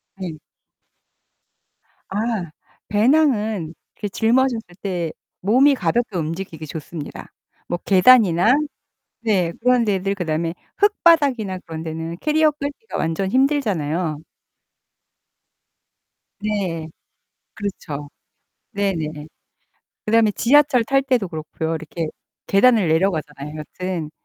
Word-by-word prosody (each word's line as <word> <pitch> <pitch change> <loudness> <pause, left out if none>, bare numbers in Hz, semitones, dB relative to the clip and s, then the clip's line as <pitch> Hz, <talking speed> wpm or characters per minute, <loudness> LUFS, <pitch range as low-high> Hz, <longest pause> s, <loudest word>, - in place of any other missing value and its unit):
네. 180 -5 -6 1.7
아. 195 - -3 0.7
배낭은 215 - +2 0.2
그 205 - -4
짊어졌을 230 -4 +1
때 175 -5 -2 0.3
몸이 260 +8 +5
가볍게 195 +1 0
움직이기 160 0 -4
좋습니다. 155 0 -8 0.4
뭐 175 - -1
계단이나 200 0 +6 0.7
네. 185 -7 +1
그런 250 0 +3
데들 195 -1 0
그다음에 165 -2 -2 0.2
흙바닥이나 285 - +3
그런 160 -1 -6
데는 160 +1 -5
캐리어 310 0 +3
끌기가 285 +10 -6
완전 175 +4 -1
힘들잖아요. 185 - +1 2.2
네. 190 -7 -2 0.7
그렇죠. 155 -8 -5 0.6
네네. 160 -7 -2 0.8
그다음에 220 0 +4
지하철 265 0 +4
탈 270 +4 +2
때도 250 -8 +1
그렇고요. 160 0 -4
이렇게 160 +1 -4 0.4
계단을 210 -2 +4
내려가잖아요, 155 -4 -1
여튼. 170 0 -5
195 Hz, 235 characters per minute, -21 LUFS, 165-240 Hz, 2.2 s, 계단이나